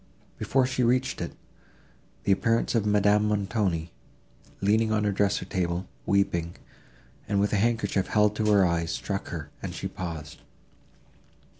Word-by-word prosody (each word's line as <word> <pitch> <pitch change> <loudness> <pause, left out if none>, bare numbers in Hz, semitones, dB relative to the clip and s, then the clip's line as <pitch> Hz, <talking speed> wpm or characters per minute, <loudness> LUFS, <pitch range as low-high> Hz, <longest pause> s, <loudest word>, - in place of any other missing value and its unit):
Before 130 -1 +2
she 130 0 -1
reached 125 +2 +1
it, - - -4 0.9
the - - +1
appearance 115 +4 +2
of 110 -3 +1
Madame 105 +1 +3
Montoni, 100 -5 -1 0.7
leaning 110 +3 +2
on 105 -1 +1
her 105 - +2
dressing 100 +1 0
table, 90 0 -2 0.2
weeping, 90 -4 +1 0.7
and 100 - +1
with 105 +2 +1
a - - +3
handkerchief 105 -3 +1
held 105 0 +3
to 105 -1 +2
her 100 -2 +5
eyes, 85 -1 0
struck 100 +4 -3
her, 75 -3 -6
and - - -5
she - - -3
paused. 80 -5 -7
100 Hz, 145 wpm, -27 LUFS, 90-105 Hz, 0.9 s, her